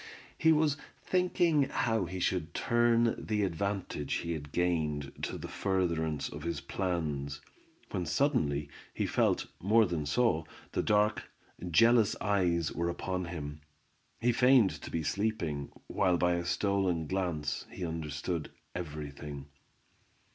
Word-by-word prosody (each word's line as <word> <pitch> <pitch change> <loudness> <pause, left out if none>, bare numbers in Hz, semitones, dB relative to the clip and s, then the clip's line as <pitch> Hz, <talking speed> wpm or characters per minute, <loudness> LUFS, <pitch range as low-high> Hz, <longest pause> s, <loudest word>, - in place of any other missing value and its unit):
He 160 - +4
was 150 -2 +3 0.3
thinking 175 -6 +2
how 115 -7 +1
he 95 +2 -5
should 90 -2 -1
turn 120 0 +2
the 105 -1 0
advantage 95 -4 -2
he 85 - -2
had 75 -3 -5
gained 75 -5 0
to - - -3
the - - -6
furtherance 80 -6 0
of 75 - -8
his 85 -2 -2
plans, 75 -7 -2 0.5
when 90 -3 -2
suddenly 80 - +1 0.3
he - - 0
felt, - - +2 0.2
more 110 +4 +5
than 85 -5 -2
saw, 80 -1 +2 0.3
that - - -1
dark, 105 0 +2 0.4
jealous 115 +5 +5
eyes 90 -6 +1
were 85 0 -1
upon 90 +1 -2
him. 75 -3 -6 0.6
He 120 +1 +3
feigned 125 -3 +5
to - - -7
be 80 - -2
sleeping, 85 -8 -1
while 95 -4 +2
by 90 +1 +3
a 85 0 -1
stolen 95 -4 +1
glance 80 -5 -2
he 90 - -5
understood 80 0 -3 0.2
every 75 -4 -5
thing. 70 -1 -8
90 Hz, 135 wpm, -31 LUFS, 75-105 Hz, 0.6 s, more